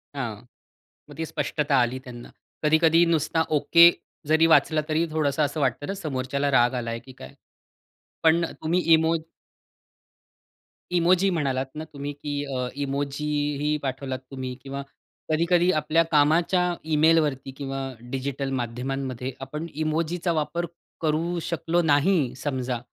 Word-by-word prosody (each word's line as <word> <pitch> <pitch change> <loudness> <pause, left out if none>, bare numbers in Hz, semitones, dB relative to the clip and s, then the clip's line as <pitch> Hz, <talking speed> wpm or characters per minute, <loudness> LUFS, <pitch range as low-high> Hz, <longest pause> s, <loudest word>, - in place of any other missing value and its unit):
हां. 120 -6 -3 0.8
मग - - -11
ती 165 - -1
स्पष्टता 145 -2 0
आली 120 +2 0
त्यांना. 120 -1 -10 0.3
कधी-कधी 160 +2 +4
नुसता 160 0 +1 0.2
ओके 170 +3 +7 0.4
जरी 160 +1 +5
वाचला 155 -1 +4
तरी 160 +2 +1
थोडंसं 155 -1 0
असं 150 +1 -3
वाटतं 135 +2 0
ना, 195 - -3
समोरच्याला 140 -5 -2
राग 125 -1 +4
आलाय 115 -1 -3
की 130 +2 -14
काय? 65 - -12 0.9
पण 165 +1 +4 0.2
तुम्ही 170 +3 +1
इमो 160 +1 +3 1.8
इमोजी 180 +2 +3
म्हणालात 135 -6 0
ना 155 - -5
तुम्ही? 140 +1 -5
की 145 0 -4
अ, 125 0 -1
इमोजीही 145 +1 -1
पाठवलात 130 0 -3
तुम्ही 130 -1 -5
किंवा 140 0 -5 0.5
कधी-कधी 170 +3 +3
आपल्या 155 +1 +2
कामाच्या 170 +4 +3 0.2
ईमेलवरती 150 -4 +3
किंवा 135 -1 -4 0.3
डिजिटल 135 +1 -3
माध्यमांमध्ये 130 +1 -4
आपण 150 +5 -5
इमोजीचा 160 +3 -1
वापर 170 +3 -1 0.4
करू 165 +3 0
शकलो 170 +1 0
नाही 145 -3 +2
समजा. 130 -3 -3
150 Hz, 125 wpm, -25 LUFS, 135-165 Hz, 1.8 s, ओके